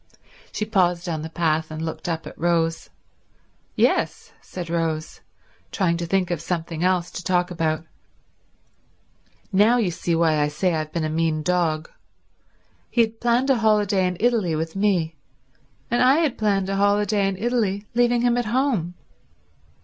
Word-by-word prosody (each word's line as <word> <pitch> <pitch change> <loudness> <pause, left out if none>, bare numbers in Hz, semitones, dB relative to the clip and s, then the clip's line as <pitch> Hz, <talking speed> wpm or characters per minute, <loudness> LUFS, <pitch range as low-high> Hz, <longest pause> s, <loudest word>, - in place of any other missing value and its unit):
She 215 - -2
paused 180 -4 +1
on 160 -3 -2
the 160 - -6
path 160 -1 0
and 155 0 -6
looked 160 +2 -4
up 165 -1 -3
at - - -9
Rose. 165 -1 0 0.9
"Yes," - - +1
said 180 -2 -7
Rose, 165 -2 -2 0.5
trying 180 -4 +1
to 170 0 -4
think 185 0 0
of 170 -3 -2
something 165 -1 -3
else 180 -1 +1
to 175 - -7
talk 180 0 +1
about. 160 -2 -1 1.7
"Now 210 +5 +5
you 210 -7 +1
see 170 0 -1
why 160 -2 +2
I 145 - +2
say 170 +5 0
I've 155 -1 -3
been 170 - -2
a - - 0
mean 160 -1 0
dog. 160 -3 0 1.0
He 240 - +2
had 225 0 -1
planned 240 +3 +2
a 265 - +3
holiday 210 -4 +2
in 180 -1 -3
Italy 220 -8 +1
with 160 +2 -3
me, 185 -6 0 0.7
and 240 +1 +2
I 255 +2 +6
had 310 -5 +1
planned 200 -3 0
a 195 - -1
holiday 205 0 +2
in 195 -1 -2
Italy 215 -3 -1
leaving 240 0 +2
him 245 0 +3
at 245 - 0
home. 215 - 0
180 Hz, 165 wpm, -23 LUFS, 165-215 Hz, 1.7 s, I